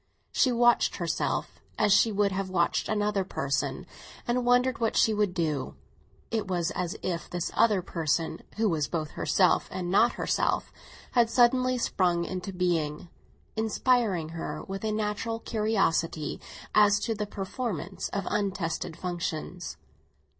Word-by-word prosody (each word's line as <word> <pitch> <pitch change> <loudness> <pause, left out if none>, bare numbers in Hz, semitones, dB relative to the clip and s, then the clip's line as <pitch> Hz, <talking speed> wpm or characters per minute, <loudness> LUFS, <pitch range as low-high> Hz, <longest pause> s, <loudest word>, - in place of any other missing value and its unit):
She 260 - +3
watched 240 0 +4
herself 170 -3 -2 0.2
as 205 - +4
she 225 - +5
would 200 -1 +2
have 190 0 -2
watched 170 -2 +1
another 210 -2 +1
person, 140 -6 -2 0.4
and 245 +1 +1
wondered 250 +1 +3
what 225 -2 0
she 220 - +4
would 205 -3 0
do. 155 -5 -1 0.6
It 220 -3 -1
was 175 -2 0
as 180 +3 -3
if 170 -2 -3
this 175 -1 -3
other 210 -4 +3
person, 165 -2 -1 0.2
who 220 0 +2
was 155 -6 0
both 155 -3 -3
herself 185 -2 +2
and 180 -1 -3
not 220 +5 +4
herself, - - 0 0.4
had 235 -2 +4
suddenly 255 +1 +4
sprung 175 -7 +1
into 185 +1 -4
being, 170 -4 -1 0.5
inspiring 220 -6 +1
her 165 0 -5
with 195 +1 -6
a 220 - 0
natural 215 +2 -2
curiosity 195 -9 0 0.3
as 205 -1 +5
to 225 - 0
the 210 -1 -3
performance 195 - -4
of 200 -2 -3
untested 190 -6 -2
functions. 175 -1 -4
195 Hz, 140 wpm, -28 LUFS, 170-220 Hz, 0.6 s, she